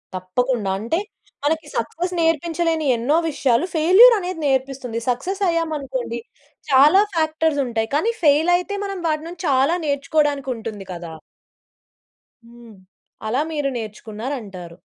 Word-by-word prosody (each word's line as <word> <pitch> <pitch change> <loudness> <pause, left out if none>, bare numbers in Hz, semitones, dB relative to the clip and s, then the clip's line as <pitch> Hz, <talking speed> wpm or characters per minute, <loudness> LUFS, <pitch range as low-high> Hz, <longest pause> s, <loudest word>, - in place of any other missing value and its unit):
తప్పకుండా! 200 +3 -1
అంటే 235 - -1 0.5
మనకి 315 0 0
సక్సెస్ 345 +10 -3
నేర్పించలేని 330 0 0
ఎన్నో 250 +7 +1
విషయాలు 275 -1 +1
ఫెయిల్యూర్ 380 +10 +7
అనేది 365 -2 -5
నేర్పిస్తుంది. 265 -3 -1
సక్సెస్ 375 +11 -2
అయ్యామనుకోండి 275 -8 -2 0.5
చాలా 290 +8 +7
ఫ్యాక్టర్స్ 315 -1 +1
ఉంటాయి. 225 -2 -2
కానీ 425 +10 +2
ఫెయిల్ 305 +3 +4
అయితే 360 +3 -4
మనం 395 -1 -4
వాటి 310 -1 -1
నుంచి 340 0 -9
చాలా 275 +5 +3
నేర్చుకోవడానికి 285 -1 0
ఉంటుంది 220 -3 -7
కదా! 170 -2 -8 1.3
హ్మ్. 235 -2 -15 0.5
అలా 245 +6 +1
మీరు 295 -3 -1
నేర్చుకున్నారంటారు. 215 -5 -6
280 Hz, 115 wpm, -21 LUFS, 235-325 Hz, 1.3 s, ఫెయిల్యూర్